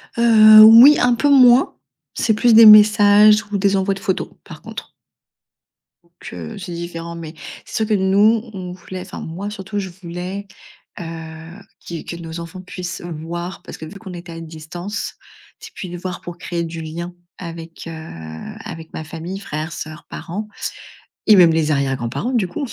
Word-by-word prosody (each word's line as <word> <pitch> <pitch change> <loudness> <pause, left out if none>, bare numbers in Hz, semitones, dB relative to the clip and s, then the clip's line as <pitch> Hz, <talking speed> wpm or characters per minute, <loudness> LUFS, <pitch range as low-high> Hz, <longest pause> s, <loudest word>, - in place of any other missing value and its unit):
Heu, 215 -2 +7
oui, 235 +7 +9
un 245 0 +3
peu 290 +5 +1
moins. 255 -2 +5 0.4
C'est 225 - +1
plus 230 +2 +3
des 225 +1 +9
messages, 210 0 +7
ou 205 - 0
des 200 0 +1
envois 195 +1 0
de 195 - -8
photos, 190 -1 -2
par - - -12
contre. - - -9 1.1
Donc 170 0 -34 0.2
heu, 85 -3 -8
c'est 180 -2 -7
différent, 170 0 -7
mais 160 -2 -8 0.3
c'est - - -10
sûr - - -8
que 215 - 0
nous, 205 +4 +2
on 185 -2 -7
voulait 185 +1 -9
enfin 185 +1 -9
moi 185 +6 -6
surtout 205 0 -5
je 190 -2 -5
voulais, 180 +2 -7 0.5
heu, - - -5 0.8
qu'ils 170 -2 -8
que - - -6
nos 165 -1 -8
enfants 170 +2 -9
puissent 180 -1 -7
voir 170 +2 -7
parce - - -10
que 160 - -9
vu 175 - -11
qu'on 195 -2 -10
était 175 -1 -9
à 165 - -8
distance, 165 +5 -7 0.4
c'est 445 0 -12
plus 185 - -7
de 175 - -7
voir 180 0 -6
pour 175 0 -9
créer 170 -1 -4
du 165 0 -6
lien 170 +3 -7 0.3
avec, 165 -1 -9
heu, - - -6 0.7
avec 160 0 -9
ma - - -6
famille, 165 +4 -7
frères, 155 -3 -5
sœurs, 155 0 -8
parents. 205 +5 -6 0.8
Et 215 - +8
même 175 -4 +6
les 160 -1 0
arrière-grands-parents 135 - -2
du 220 -7 +1
coup. 175 +10 -5
180 Hz, 180 wpm, -19 LUFS, 165-210 Hz, 1.1 s, oui